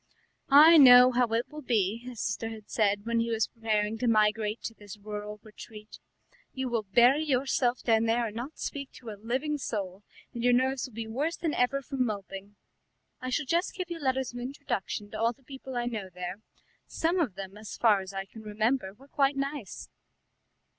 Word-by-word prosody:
"I 310 +4 +9
know 250 -2 +9
how 245 0 +2
it 230 +1 0
will 305 0 -8
be," 220 -5 0
his 245 -1 -9
sister 215 +2 -2
had 220 -2 -11
said 205 -1 +1
when 230 0 0
he 230 0 0
was 225 -1 +1
preparing 220 -1 -2
to 250 - 0
migrate 215 0 +2
to 225 - -4
this 205 -2 -11
rural 210 0 -7
retreat; 215 0 -12 0.5
"you 260 -1 -3
will 235 -2 0
bury 240 +9 +4
yourself 255 -3 0
down 225 -1 +3
there 230 +1 +1
and 215 -1 -6
not 255 +7 -6
speak 280 -1 -5
to 235 -3 -9
a 205 -1 -11
living 265 +6 -2
soul, 200 -6 -4 0.3
and 235 - -5
your 245 0 +4
nerves 260 +1 +1
will 245 - -17
be 230 0 -4
worse 285 +9 -2
than 320 -3 -2
ever 275 +3 +1
from 265 0 -1
moping. 200 -2 -6 0.7
I 255 - -4
shall 280 +3 -1
just 340 +7 0
give 365 -2 -5
you 335 - -4
letters 265 -3 -1
of 245 - -6
introduction 245 -6 -4
to 215 - -6
all 230 +1 +2
the 270 - -29
people 265 -1 -8
I 240 - -1
know 215 -6 -4
there. 180 +2 -6 0.5
Some 340 +3 0
of 255 - 0
them, 195 0 -8
as 215 0 -9
far 210 -4 +4
as 190 0 -8
I 195 0 -5
can 220 +3 -13
remember, 215 0 -1
were 270 +5 -18
quite 280 -1 +1
nice." 275 -6 -5
235 Hz, 200 wpm, -28 LUFS, 210-265 Hz, 0.7 s, I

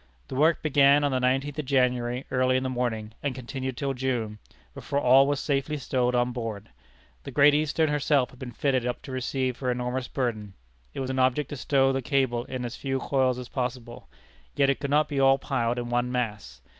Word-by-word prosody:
The - - -5
work 155 +4 +3
began 145 -1 +5
on 145 - +1
the 130 - +1
nineteenth 135 +3 0
of 150 - -3
January, 125 -1 +1
early 130 0 +2
in 130 - -1
the 130 - -2
morning, 115 -3 -2
and 140 -3 -2
continued 130 0 -5
till 140 -2 -1
June, 120 -5 -2 0.3
before 140 - -2
all 135 +1 +5
was 145 -1 0
safely 145 +1 -1
stowed 125 -2 0
on 125 0 +1
board. 115 -4 -5 0.5
The - - -9
Great 145 +2 +5
Eastern 155 +2 +1
herself 145 -3 +1
had 125 - -17
been 125 -2 -7
fitted 130 0 0
up 125 0 -3
to 135 - -8
receive 130 0 -2
her 130 - -2
enormous 125 +1 -2
burden. 110 -6 -3 0.4
It - - -3
was 130 0 -3
an 130 - -2
object 130 +2 +1
to - - -3
stow 135 0 +2
the 135 - -1
cable 130 -3 0
in 125 -1 -5
as 120 - -5
few 135 -1 -2
coils 130 -2 +1
as 125 -1 -7
possible. 125 - -5 0.5
Yet 140 -1 +3
it 140 - -3
could 140 0 -3
not 150 +2 +3
be 145 -2 -2
all 135 0 +5
piled 120 -3 -1
in 120 -1 -4
one 120 +1 0
mass. 105 - -4
130 Hz, 215 wpm, -26 LUFS, 125-140 Hz, 0.5 s, began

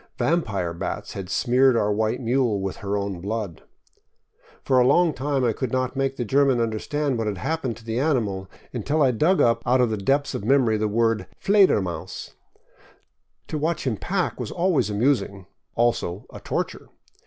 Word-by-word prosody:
Vampire 100 - 0
bats 85 - -5
had 95 -2 -6
smeared 125 +3 +3
our 105 -2 +1
white 110 +3 0
mule 120 -3 +1
with 95 -1 -4
her 100 -1 -2
own 100 -3 -3
blood. 100 -4 -4 1.0
For 130 -1 +3
a 125 - +4
long 165 +3 +4
time 140 0 -1
I 120 -2 +2
could 130 +1 -3
not 130 +1 -1
make 135 0 0
the 120 - -3
German 135 +1 +3
understand 120 +4 -1
what 110 - -1
had 100 -2 -2
happened 130 - -2
to 115 - -16
the 115 +1 -2
animal, 110 -10 0 0.2
until 145 +6 0
I 130 - +4
dug 160 - +2
up 115 0 +3
out 125 +3 +2
of 125 -3 +2
the 110 - -1
depths 140 +8 0
of - - -4
memory 120 -2 +3
the 110 0 0
word 115 +1 +1
" - - -40
Fledermaus." 185 - +1 1.2
To 155 - -2
watch 160 +1 -1
him 125 -4 0
pack 185 - -2
was - - -4
always 175 - +1
amusing 105 -3 0 0.2
— - - -48
also 115 -5 0
a - - -8
torture. - - -4
120 Hz, 185 wpm, -24 LUFS, 105-140 Hz, 1.2 s, a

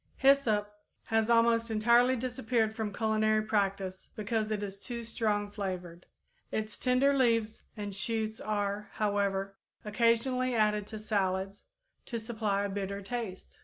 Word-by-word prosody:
_ - - -50
Hyssop 215 -7 +3 0.2
has 225 0 +1
almost 230 0 +4
entirely 235 +4 +4
disappeared 240 -3 0
from 220 -2 -2
culinary 215 0 +2
practice 195 -3 -1
because 215 0 -1
it 210 -1 -2
is 195 -1 -4
too 235 +3 -5
strong 210 -3 -1
flavored. 180 -4 -5 0.4
Its 215 -1 -2
tender 265 +2 +3
leaves 230 -4 +2 0.2
and 205 -1 -4
shoots 220 +2 -2
are, 205 -1 -2
however, 200 -2 0 0.3
occasionally 235 +3 +2
added 210 -2 +2
to 220 - -6
salads, 195 -2 -1 0.4
to 235 - -3
supply 215 -3 -1
a 200 - -1
bitter 200 0 -4
taste. 220 -4 -6
215 Hz, 135 wpm, -31 LUFS, 200-230 Hz, 0.4 s, almost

